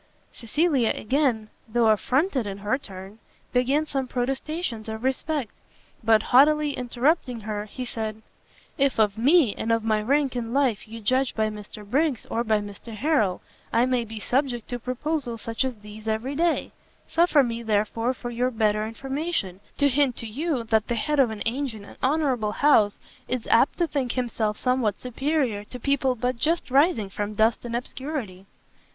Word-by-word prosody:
Cecilia 270 0 +1
again, 240 -3 0 0.2
though 225 0 +3
affronted 260 - +1
in 195 -1 -5
her 210 +7 -1
turn, 195 -2 -10 0.3
began 265 +5 +2
some 270 -3 -2
protestations 260 -1 -3
of 220 +1 -5
respect; 265 -1 -1 0.5
but 220 -1 +4
haughtily 295 +3 +5
interrupting 250 0 0
her, 210 0 -4
he 250 +4 -6
said, 220 -2 -4 0.6
"If 275 -1 +2
of 210 -2 +3
me, 260 - +4
and 230 - -2
of 230 -1 +2
my 215 -1 +1
rank 275 +3 +1
in 235 -1 -3
life 260 -7 +1
you 225 +1 -9
judge 255 +4 +1
by 220 -1 +1
Mr 210 0 -9
Briggs 280 +2 +1
or 230 - 0
by 215 -2 +2
Mr 205 +2 -9
Harrel, 220 - +1 0.3
I 235 +2 +3
may 255 -2 +1
be 225 -1 -8
subject 245 0 -1
to 245 - -3
proposals 255 -1 -3
such 230 +3 -1
as 260 -2 -2
these 210 +1 -12
every 220 +5 -1
day; 335 +3 0 0.4
suffer 330 -4 +4
me, 235 -1 -3
therefore, 225 +3 0
for 240 0 -6
your 245 +2 0
better 215 -2 +1
information, 270 - -3 0.2
to 285 - +4
hint 275 -2 +2
to - - -5
you, 265 +3 -2
that 220 -1 +1
the 235 - -1
head 295 +6 0
of 260 -4 +5
an 215 -2 -5
ancient 230 -3 -2
and - - -14
honourable 260 -7 +1
house, 220 -9 +4 0.3
is 250 -2 -2
apt 245 +5 +4
to 345 - +2
think 275 -6 -2
himself 225 -4 -1
somewhat 250 -6 0
superior 255 -4 -1
to 250 +3 -9
people 270 0 +1
but 250 +1 -1
just 320 +2 0
rising 270 - +3
from 205 +1 -4
dust 220 +3 +2
and 235 0 -3
obscurity." 240 -7 -5
240 Hz, 170 wpm, -25 LUFS, 220-275 Hz, 0.6 s, haughtily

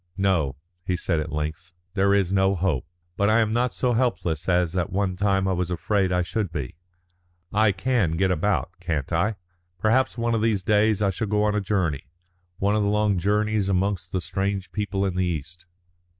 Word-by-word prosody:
"No," 90 -9 +1 0.3
he 90 0 -1
said 85 -2 0
at 75 - -4
length. 80 +3 -4 0.2
"There 100 0 +2
is 95 -2 +1
no 95 0 +3
hope. 85 -8 -1 0.3
But 100 +1 +2
I 110 - +4
am 110 -1 +2
not 120 +2 +1
so 125 -1 0
helpless 95 - 0
as 90 -1 +2
at 90 -2 0
one 95 -1 0
time 95 0 +1
I - - +1
was 90 -1 -1
afraid 95 +2 0
that 90 - +1
I 90 - +2
should 100 +1 -2
be. 70 -6 -5 0.8
I 110 0 +4
can 95 -3 0
get 95 +1 +2
about, 90 +2 0
can't 85 -4 -3
I? 105 +7 +1 0.4
Perhaps 115 +7 +2
one 115 0 0
of 115 - +1
these 110 -4 +1
days 105 0 +3
I 100 - +2
shall 105 +4 -3
go 105 +1 +1
on 105 0 +2
a 105 - 0
journey, 90 -9 -1 0.5
one 100 +2 +1
of 110 - +2
the 100 - +1
long 105 -2 +2
journeys 105 +1 +1
amongst 95 -1 0
the 95 - -1
strange 95 +1 -2
people 100 -2 -1
in 95 -2 -2
the 95 0 +1
East." 85 +3 -5
95 Hz, 205 wpm, -24 LUFS, 90-105 Hz, 0.8 s, I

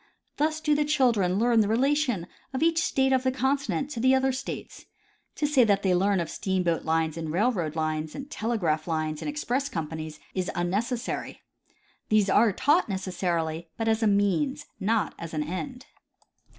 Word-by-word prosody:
Thus 310 +1 +1
do 300 -1 +2
the 295 0 +2
children 235 -11 +2
learn 235 +1 +3
the 205 - +1
rela 260 +7 +2
tion 245 - 0 0.3
of 260 - 0
each 330 0 +3
state 265 -3 +2
of 260 - +3
the 260 0 +1
continent 275 +2 -1
to 240 - -4
the 260 +3 +4
other 265 0 +2
states. 260 +1 -6 0.5
To 300 - 0
say 290 -4 +4
that 200 -3 +2
they 190 -2 +3
learn 195 +2 +2
of 170 - -2
steamboat 180 -1 -1
lines 160 0 0
and 160 -2 -4
railroad 180 -5 0
lines, 155 -1 -2
and 275 - -6
tele 235 -5 -2
graph 155 -4 0
lines 155 -1 -2
and - - -3
express 280 -2 -1
companies, 160 - -5
is 185 -1 -2
unnecessary. 225 +8 -2 0.7
These 210 -2 +3
are 230 +1 +5
taught 295 - +2
necessarily, 175 -4 -2
but 225 - -2
as 220 +1 +2
a 220 - +3
means, 205 +9 +1
not 220 +2 0
as 165 -1 -6
an 150 - 0
end. 245 - -5
215 Hz, 180 wpm, -27 LUFS, 170-265 Hz, 0.7 s, are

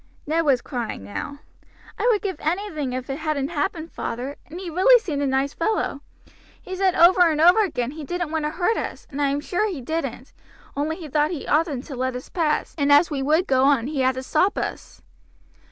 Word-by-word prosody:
Ned 320 +2 0
was 265 -4 +3
crying 240 - -4
now. 100 - -6 0.6
"I - - +1
would 445 -4 +2
give 385 -3 -2
anything 315 -5 -2
if 255 0 -4
it 275 +2 -4
hadn't 305 -3 -1
happened, 330 0 -3
father, 255 +5 -4
and 335 +4 -8
he 375 - -7
really 375 +10 +6
seemed 310 -11 -3
a 285 - +1
nice 270 +1 0
fellow. 335 -6 -1 0.6
He 375 - -7
said 375 -1 +2
over 355 +2 +6
and 305 -1 -1
over 355 +7 +6
again 255 - -2
he 305 +1 -8
didn't 350 +2 -3
want 320 -2 -1
to - - 0
hurt 355 +8 0
us, - - -5
and 285 +1 -4
I 285 - +3
am 280 +1 -1
sure 425 +7 -1
he 350 -8 -5
didn't, 275 -2 -4 0.4
only 300 +3 -1
he 335 -3 -8
thought 300 +1 +1
he 335 -6 -5
oughtn't 300 -4 +1
to 280 - -7
let 255 0 -2
us 250 - -7
pass, 320 -4 -1
and 285 0 +2
as 295 +4 +6
we 280 -2 -2
would 310 +6 +2
go 260 -3 +3
on 275 -5 +3
he 285 0 -3
had 260 0 +2
to 260 - -5
stop 365 +9 +1
us." - - -5
300 Hz, 220 wpm, -23 LUFS, 275-350 Hz, 0.6 s, really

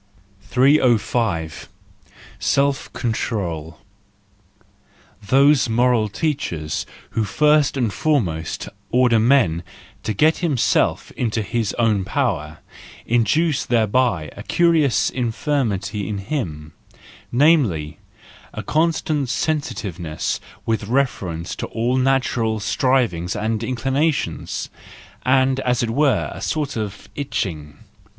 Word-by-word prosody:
305 120 - +1 0.7
Self 140 - +1
control 90 -9 -3 0.7
— 105 - -32
Those 140 0 +5
moral 120 -1 +2
teachers 105 - -2 0.2
who 110 0 0
first 150 +6 +3
and 115 -6 0
foremost 95 - -1 0.2
order 125 -2 +4
man 110 -9 +3 0.4
to - - -2
get 155 +9 +4
himself 145 -9 +1
into 115 -2 -1
his 115 -1 -1
own 110 -5 +1
power, 90 - -2 0.4
induce 125 +7 +2
thereby 115 -7 +1
a - - -8
curious 160 0 +2
infirmity 115 - -1
in 105 - -2
him,—namely, 95 - -1 0.6
a - - -4
constant 155 -3 0
sensitiveness 100 - -2 0.3
with 110 -2 -1
refer¬ 125 -7 0
ence 85 +1 -5
to - - -4
all 120 +3 -1
natural 125 -4 +1
strivings 105 - +1
and 110 +1 -1
inclinations, 135 +6 -1 0.5
and 130 +1 +3
as 125 -2 0
it 115 - -1
were, 135 -2 +2
a - - -9
sort 150 -3 -2
of 105 -3 -5
itching. 80 - -4
120 Hz, 100 wpm, -21 LUFS, 100-135 Hz, 0.7 s, Those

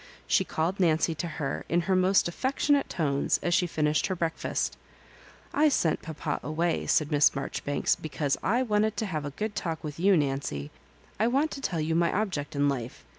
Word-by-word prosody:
She - - +3
called 170 +5 -2
Nancy 165 -2 +3
to 170 +2 -4
her 155 -4 -3
in 175 +1 +2
her 190 +2 +1
most 185 +1 +4
affectionate 275 +8 +1
tones 140 -5 0
as 175 - +1
she 175 +1 +3
finished 150 -2 +1
her 190 - -2
breakfast. 165 -2 -2 0.8
*'I 305 +1 +4
sent 170 - +1
papa 155 -2 -4
away," 165 +3 -1
said 155 0 +2
Miss 145 0 +5
Marjoribanka, 140 +1 -1
"because 145 -2 -1
I 240 +7 +2
wanted 215 -2 +1
to 220 - -1
have 155 -7 -3
a - - -3
good 215 0 -2
talk 165 -2 -3
with 150 0 -6
you, 190 +1 +5
Nancy. 135 - -2 0.5
I 220 - +3
want 275 +6 +1
to 275 - -6
tell 175 -11 -2
you 155 +1 0
my 170 +1 +2
object 180 -9 -2
in 145 0 +2
life. 125 - -3
165 Hz, 190 wpm, -28 LUFS, 150-195 Hz, 0.8 s, Miss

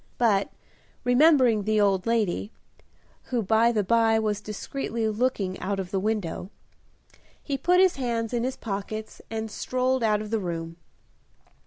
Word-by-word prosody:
But, 210 -5 +2 0.5
remembering 250 -3 +5
the 215 +1 +1
old 195 -1 +2
lady 220 -3 0 0.7
(who, 240 -3 -1
by 225 +4 +3
the 215 -3 +1
by, 225 +2 +3
was 210 -2 -1
discreetly 225 +2 -3
looking 215 -4 -1
out 195 +1 -2
of 185 -1 -5
the 195 - 0
window), 200 -3 -2 0.9
he 280 - -3
put 355 +7 +3
his 375 -4 +4
hands 235 -3 -2
in 235 -1 0
his 260 +1 -2
pockets 215 +1 -5
and 220 -1 -4
strolled 255 +2 0
out 215 -2 +2
of 215 0 -7
the 225 - +1
room. 165 -3 -5
220 Hz, 150 wpm, -26 LUFS, 205-240 Hz, 0.9 s, remembering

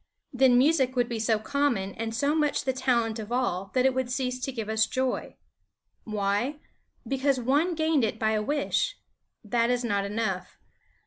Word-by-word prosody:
Then 255 -1 +5
music 265 -1 +3
would 245 -1 +2
be 235 -2 -3
so 220 0 +2
common 220 -5 -1
and 225 0 -4
so 280 +5 +1
much 300 -2 +1
the 260 - 0
talent 235 -4 0
of 215 +1 -7
all 195 -7 -1
that 255 0 +3
it 265 - +4
would 260 -1 -1
cease 255 -1 -2
to 270 - -3
give 225 -4 -5
us 220 0 +2
joy. 260 0 -2 0.7
Why? 215 +7 -1 0.5
Because 270 0 +1
one 290 +8 +1
gained 315 -4 +2
it 220 -1 -1
by 220 -1 +1
a 215 -1 +1
wish. 295 - -1 0.5
That 230 +2 +1
is 245 0 +1
not 205 -4 0
enough. 200 -3 -3
245 Hz, 180 wpm, -27 LUFS, 220-270 Hz, 0.7 s, Then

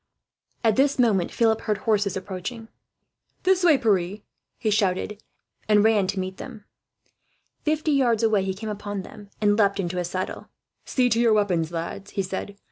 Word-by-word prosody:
At 220 -2 +3
this 280 +1 +3
moment 210 -8 +2
Philip 225 -1 +2
heard 210 -2 -1
horses 205 -3 +1
approaching. 200 +5 -6 0.7
"This 375 0 +3
way, 325 -5 +6
Pierre," 200 -3 0 0.4
he 220 -3 -1
shouted, 205 +1 0 0.5
and 210 -1 +5
ran 215 -3 +3
to 195 0 -2
meet 185 0 -4
them. 225 -6 -9 1.0
Fifty 310 0 +1
yards 240 -5 +2
away 215 -3 +3
he 190 0 -2
came 215 +2 -6
upon 205 -1 -5
them, 205 +2 -12
and 205 -1 +4
leapt 200 -1 +3
into 180 -1 -2
his 175 -1 -2
saddle. 185 +1 -4 0.4
"See 255 -2 +2
to 230 -1 +1
your 235 -2 +4
weapons, 180 -6 +1
lads," 170 +4 -5
he 195 - +2
said. 190 +2 -5
205 Hz, 170 wpm, -24 LUFS, 190-225 Hz, 1.0 s, way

